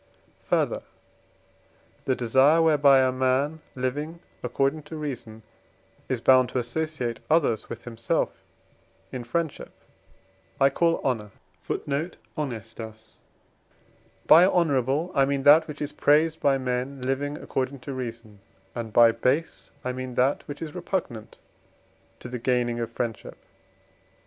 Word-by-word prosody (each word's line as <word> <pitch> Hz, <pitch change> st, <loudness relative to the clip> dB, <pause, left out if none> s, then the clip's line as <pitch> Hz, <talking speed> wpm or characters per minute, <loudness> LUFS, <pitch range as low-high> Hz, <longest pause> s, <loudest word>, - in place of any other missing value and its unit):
Further, -, -, +1 dB, 1.2 s
the 130 Hz, -, +1 dB
desire, 130 Hz, +7 st, +4 dB
whereby 145 Hz, -4 st, +5 dB
a -, -, +1 dB
man 130 Hz, +4 st, 0 dB
living 145 Hz, +6 st, -3 dB, 0.2 s
according 140 Hz, +3 st, 0 dB
to 160 Hz, -, -8 dB
reason 120 Hz, -7 st, -6 dB, 0.7 s
is 125 Hz, -3 st, -1 dB
bound 130 Hz, -1 st, +5 dB
to -, -, -3 dB
associate 125 Hz, -1 st, -2 dB
others 150 Hz, -9 st, +2 dB
with -, -, -7 dB
himself 115 Hz, -1 st, -2 dB, 0.7 s
in 125 Hz, -2 st, -5 dB
friendship, 160 Hz, +5 st, -3 dB, 0.9 s
I 135 Hz, 0 st, +5 dB
call 165 Hz, +3 st, +1 dB
honour; 115 Hz, -6 st, -1 dB, 3.0 s
by 170 Hz, +3 st, +8 dB
honourable 155 Hz, -2 st, +1 dB
I 135 Hz, -1 st, +4 dB
mean 140 Hz, 0 st, -1 dB
that 155 Hz, +3 st, +7 dB
which 150 Hz, -2 st, -8 dB
is 145 Hz, -, -4 dB
praised 155 Hz, +2 st, +3 dB
by 140 Hz, -1 st, +3 dB
men 130 Hz, +1 st, -3 dB
living 140 Hz, +3 st, -1 dB
according 135 Hz, -1 st, -3 dB
to 140 Hz, -, -6 dB
reason, 115 Hz, -5 st, -7 dB, 0.3 s
and 115 Hz, -2 st, -5 dB
by 115 Hz, +1 st, +7 dB
base 130 Hz, +8 st, -1 dB, 0.2 s
I 125 Hz, -, 0 dB
mean 130 Hz, -1 st, -6 dB
that 130 Hz, +3 st, +1 dB
which 145 Hz, +2 st, -6 dB
is 155 Hz, -, -7 dB
repugnant 175 Hz, -, -4 dB, 0.8 s
to -, -, -7 dB
the 125 Hz, 0 st, -5 dB
gaining 120 Hz, -1 st, 0 dB
of 115 Hz, -, -2 dB
friendship. 115 Hz, -2 st, -4 dB
135 Hz, 125 wpm, -26 LUFS, 125-150 Hz, 3.0 s, by